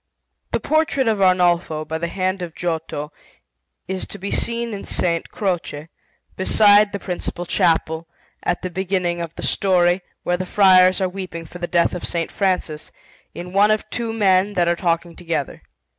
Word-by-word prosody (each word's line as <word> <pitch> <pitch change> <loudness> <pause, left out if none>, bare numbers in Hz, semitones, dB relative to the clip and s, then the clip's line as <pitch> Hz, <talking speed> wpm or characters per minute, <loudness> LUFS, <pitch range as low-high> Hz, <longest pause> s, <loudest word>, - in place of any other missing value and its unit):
The - - +1
portrait 310 -5 +1
of 215 -3 +1
Arnolfo, 175 -4 +2
by 160 +1 -4
the 170 - -2
hand 185 +1 -2
of 170 -2 -6
Giotto, 160 -3 -3 0.8
is 190 0 -4
to - - -9
be 200 +1 -5
seen 235 -1 0
in 200 - -5
S. - - -2 0.3
Croce, 165 -6 -3 0.5
beside 205 +2 +5
the - - -3
principal 175 -2 -5
chapel, 165 -2 +1 0.3
at 175 - -2
the 185 - -3
beginning 180 -2 -1
of 165 -1 -6
the - - -7
story, 180 -1 +2 0.2
where 175 - 0
the 185 0 -4
friars 185 -1 +5
are 190 - +2
weeping 180 -3 -7
for 180 +3 -11
the 175 - -3
death 170 -1 +2
of 180 - -5
S. 165 -1 -1
Francis, 180 -6 -1 0.4
in 180 +1 -7
one 200 +2 +5
of 215 0 +1
two 230 -2 -3
men 200 -2 +2
that 175 -3 +1
are 170 - +2
talking 170 -1 -1
together. 165 -5 -4
180 Hz, 175 wpm, -21 LUFS, 170-195 Hz, 0.8 s, beside